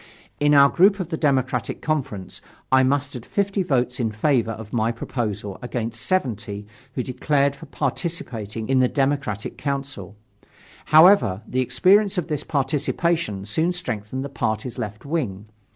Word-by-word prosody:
In 145 0 +4
our 140 0 +8
group 195 +7 +4
of 180 -3 -3
the 165 - -1
Democratic 130 -5 0
Conference, 135 -11 -3 0.3
I 130 0 +6
mustered 135 -2 0
50 200 - -1
votes 130 -6 0
in 115 -3 0
favor 115 +1 +1
of 110 -1 -7
my 115 -1 +1
proposal 105 -5 -4
against 115 -2 -4
70 105 - -2 0.3
who 125 - -1
declared 140 +2 +1
for - - -12
participating 120 - -4
in 130 -1 +3
the 130 - +4
Democratic 135 -5 -1
Council. 135 -8 -4 0.7
However, 155 - +6
the 130 - -1
experience 185 - +3
of 175 -1 -2
this 150 -3 -2
participation 150 - -1
soon 160 - +1
strengthened 130 - -4
the - - -5
party's 115 -2 -3
left 105 +3 -5
wing. 125 - -2
130 Hz, 145 wpm, -23 LUFS, 110-150 Hz, 0.7 s, our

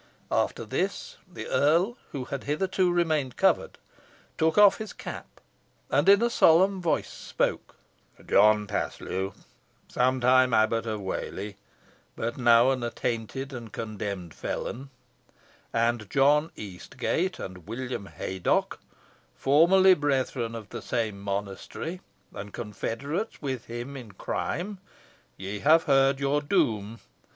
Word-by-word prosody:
After - - 0
this - - -3
the - - -7
earl, 170 +10 +2 0.2
who 130 -3 -4
had 140 +1 -5
hitherto 185 +4 +1
remained 155 -7 0
covered, - - +2 0.6
took 160 0 +1
off 205 -1 +7
his 220 -2 -6
cap, - - -9 0.5
and 145 +7 +3
in 200 +3 +7
a 235 - +3
solemn 190 +1 +4
voice 170 - 0
spoke: - - -2 0.5
"John 105 +1 +4
Paslew, 95 -1 -3 0.5
somewhile 130 -1 +3
Abbot 115 +1 +2
of 110 -2 -3
Whalley, 100 +1 -5 0.6
but 115 +1 -3
now 120 0 +5
an 130 -2 -1
attainted 120 +3 -3
and 115 -4 -8
condemned 100 -7 -5
felon, 135 - -5 0.8
and 115 -2 0
John 145 +3 +3
Eastgate 105 - -3
and 90 -2 -8
William 120 -2 -5
Haydocke, 95 -2 -1 0.6
formerly 180 +7 +5
brethren 130 -6 -1
of 110 -3 -8
the - - -6
same 110 -4 -2
monastery, 100 - -5 0.3
and 100 +1 -7
confederates 120 - -4
with 130 -5 -4
him 120 +4 -6
in 120 -7 -9
crime, 185 - -3 0.6
ye 100 +2 -5
have 160 +6 +5
heard 135 -1 +3
your 140 +1 +1
doom. 115 - 0
130 Hz, 120 wpm, -27 LUFS, 110-155 Hz, 0.8 s, off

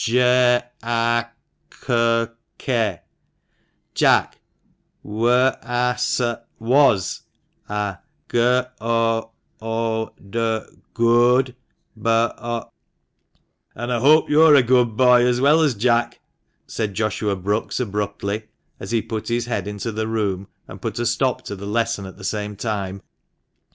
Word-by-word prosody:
"J 125 +1 +4 0.2
a 115 0 +1 0.5
c 115 -1 +1 0.3
k 110 -9 -1 0.4
— - - -46
Jack, - - +2 0.6
w 110 +3 -1
a 125 0 +3 0.4
s 125 +1 0 0.3
— - - -45
was, 115 - +2 0.5
a 105 -2 -3 0.3
g 120 - 0 0.4
o 115 0 0 0.3
o 115 0 -2 0.2
d 115 +1 -1 0.2
— - - -34
good, 120 +2 +3 0.4
b 110 - -18
o 115 0 -1 0.5
" - - -46
"And 120 +2 -3
I 120 - 0
hope 150 +6 +5
you're 155 0 +6
a 135 - +6
good 120 -2 +2
boy, 125 -1 +5
as 125 0 +2
well 150 +5 +4
as 145 -6 +2
Jack," 120 +2 +1 0.5
said 105 -3 -4
Joshua 105 -1 -1
Brookes 100 +4 -2
abruptly, 105 -1 -3 0.3
as - - -8
he 115 -1 0
put 110 -2 -5
his 120 0 -1
head 105 -5 -3
into 105 +2 -4
the 110 +1 -3
room, 100 -4 -2 0.2
and - - -11
put - - -4
a 120 - -1
stop 125 +2 0
to 100 - -6
the 100 +1 -8
lesson 115 -2 -1
at 95 - -12
the 100 - -12
same 105 +1 -3
time. 100 -3 -4
115 Hz, 140 wpm, -21 LUFS, 105-120 Hz, 0.6 s, you're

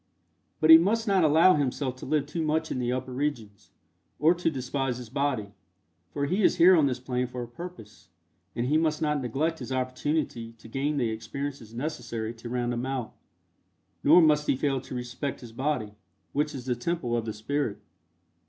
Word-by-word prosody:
But 155 +1 +6
he 160 - +12
must 220 +6 +1
not 195 -3 +3
allow 160 +4 +6
himself 135 -3 -1
to - - -9
live 150 0 +1
too 165 +3 -4
much 155 +1 0
in - - -2
the 120 0 0
upper 130 +1 -3
regions, 125 -8 -4 0.5
or 160 +4 +5
to 175 -1 0
despise 135 -2 -2
his 120 -3 -9
body, 130 -8 -1 0.6
for 140 -1 -2
he 185 +8 0
is - - +4
here 180 +2 +7
on 155 -4 +4
this 125 -2 -2
plane 125 0 -2
for 125 0 -5
a - - -7
purpose, 120 - -11 0.5
and 120 - -1
he 150 +5 +3
must 155 -2 +1
not 150 -2 0
neglect 150 +7 -1
his 130 0 -7
opportunity 130 -2 -2
to 115 - -15
gain 140 +5 -1
the 120 -4 +1
experiences 115 +1 -6
necessary 120 -5 -4
to 120 +1 -9
round 120 0 -1
him 120 +2 -3
out, 130 -4 -3 0.9
nor 165 +4 +7
must 150 -1 +3
he - - +3
fail 135 -1 0
to 130 - -8
respect 125 +2 -4
his 120 -2 -10
body, 125 -4 -2 0.4
which 150 +1 0
is 125 -2 -7
the 125 -2 0
Temple 120 -2 -2
of 115 -1 -1
the 110 - -3
Spirit. 110 +1 -2
135 Hz, 195 wpm, -27 LUFS, 120-150 Hz, 0.9 s, he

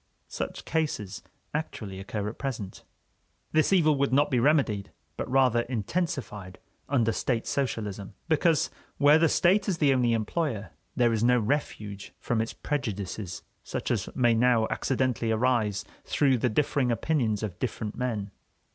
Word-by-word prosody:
Such - - -5
cases 150 - -2 0.3
actually 110 -11 -4
occur 100 +1 -4
at 110 - -6
present. 115 -9 -5 0.7
This 155 +3 +3
evil 160 -6 +4
would 140 -1 +2
not 145 +3 +3
be 125 - +3
remedied, 120 -8 +2 0.2
but - - -4
rather 130 -2 +4
intensified, 120 - -3 0.3
under 120 -5 +2
state 115 0 -1
socialism, 105 -7 -3
because, 160 -1 +2 0.3
where 145 +2 +6
the 165 -1 +4
State 195 +3 +3
is 180 - 0
the 145 -4 +4
only 125 -2 +2
employer, 110 - -2 0.2
there 120 -2 +3
is 110 0 0
no 125 +1 +5
refuge 105 -5 -3
from 115 -2 0
its 115 - -3
prejudices 105 -8 -4 0.2
such - - -3
as - - -1
may 120 -2 +4
now 115 -1 +3
accidentally 130 -3 0
arise 110 -4 +1 0.2
through 135 -4 +2
the 125 - +2
differing 135 +1 +1
opinions 115 -3 0
of 95 -5 -5
different 110 -3 -3
men. 110 -6 -2
120 Hz, 145 wpm, -28 LUFS, 105-145 Hz, 0.7 s, where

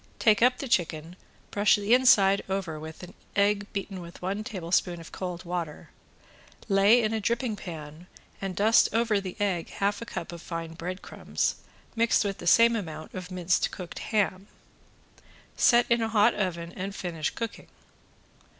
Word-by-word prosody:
Take 215 -2 +4
up 250 +1 +5
the 275 - -5
chicken, 165 -5 -1 0.4
brush 205 0 +4
the 205 +2 +1
inside 200 -6 +5
over 190 -5 -3
with 160 +2 -9
an 180 - -10 0.2
egg 205 0 +1
beaten 195 -2 -5
with 170 0 -11
one 195 +4 -3
tablespoon 180 -4 -1
of 165 - -11
cold 180 -1 -5
water, 170 -3 -5 0.8
lay 205 +4 +5
in 215 0 0
a 220 - -1
dripping 235 +1 -1
pan 160 -2 -9 0.3
and 195 -2 -3
dust 215 +5 +4
over 225 -3 +2
the 185 -2 -6
egg 190 -5 -1
half 200 +2 -1
a - - -5
cup 170 - -5
of 170 -1 -9
fine 165 -2 -5
bread 180 +3 -6
crumbs - - -2 0.4
mixed 230 -1 +3
with 195 -1 -3
the - - -6
same 230 +5 +6
amount 160 -7 -6
of 185 -1 -6
minced 180 -1 +1
cooked 180 -2 -8
ham. 200 -3 -1 1.1
Set 240 -1 +5
in 235 0 +2
a 225 - 0
hot 215 +1 +4
oven 170 -4 -3
and 195 +2 -5
finish 165 -4 -3
cooking. 230 -1 -6
195 Hz, 170 wpm, -27 LUFS, 175-215 Hz, 1.1 s, same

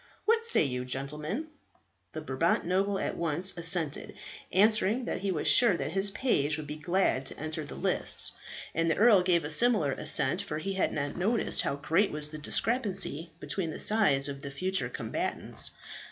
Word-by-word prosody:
What 455 +1 +2
say 465 - +4
you, 125 -3 -3
gentlemen?" 150 - -3 0.6
The - - -6
Brabant - - 0
noble 195 +3 0
at - - -3
once 170 +3 -2
assented, 165 -3 0 0.4
answering 215 +4 +2
that - - -3
he 195 +1 -2
was 160 - -3
sure 230 -8 +5
that 150 - -4
his 195 +3 +2
page 155 - 0
would 155 - -7
be 150 +1 -6
glad 170 -3 0
to - - -7
enter 155 0 -5
the 145 - -9
lists; - - 0 0.4
and 165 +1 0
the - - 0
earl 215 -3 +5
gave 175 -3 +1
a 150 - -3
similar 210 - +3
assent, 140 +6 0
for 155 -6 -5
he 195 +5 -4
had 190 - 0
not 145 -1 -4
noticed 215 +6 0
how - - -2
great 165 +8 +1
was 150 0 +3
the 155 - -7
discrepancy 195 - 0
between 180 -3 -3
the - - -7
size 150 -11 +4
of 140 -1 -7
the 140 - -7
future 185 +7 -2
combatants. - - 0
170 Hz, 180 wpm, -29 LUFS, 150-200 Hz, 0.6 s, sure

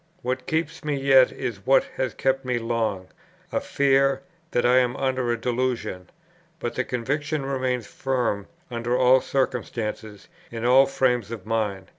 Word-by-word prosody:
"What 130 +1 -3
keeps 165 +1 -2
me 150 -1 -1
yet 135 -1 +5
is 115 -7 -5
what 135 - +5
has 130 -3 -1
kept 135 0 0
me 125 -1 -1
long; 115 -5 -2 0.4
a - - 0
fear 135 -1 +2 0.3
that 120 - 0
I 125 +1 +6
am 125 0 0
under 130 -2 0
a 120 - -1
delusion; 120 -7 -2 0.5
but 120 - -3
the 130 - -1
conviction 145 +4 -2
remains 130 -3 -1
firm 125 -7 -2 0.2
under 120 +1 -1
all 130 0 +5
circumstances, 110 -5 -3 0.2
in 115 0 -5
all 130 +2 +6
frames 125 -5 +1
of 115 -5 -7
mind. 105 -4 -1
125 Hz, 155 wpm, -24 LUFS, 115-135 Hz, 0.5 s, I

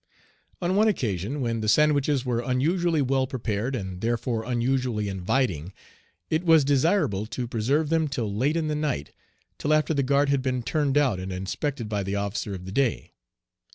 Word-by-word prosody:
On 180 +2 +1
one 215 +2 +4
occasion 120 - -1
when 115 -2 -1
the 110 - 0
sandwiches 145 +1 +3
were 120 -2 0
unusually 155 +6 +1
well 130 0 +1
prepared, 125 -1 -2
and 95 -5 -5
therefore 115 0 -1
unusually 120 -2 0
inviting, 95 - -1 0.6
it 155 +2 +1
was 160 -4 +5
desirable 140 - +2
to 120 +2 -4
preserve 135 +7 0
them 160 -1 +2
till 120 -7 -3
late 140 +9 +1
in 160 -2 -1
the 155 - -1
night, 150 - -2 0.5
till 145 - -1
after 155 +1 +3
the 140 - +1
guard 140 +2 +2
had 140 -1 +2
been 130 -2 -1
turned 145 +1 0
out 130 -10 +2
and 95 +1 -5
inspected 110 +7 -3
by 105 -1 -1
the 100 +1 -3
officer 100 0 -3
of 90 -1 -9
the 95 - -7
day. 130 +2 0
130 Hz, 180 wpm, -26 LUFS, 105-145 Hz, 0.6 s, was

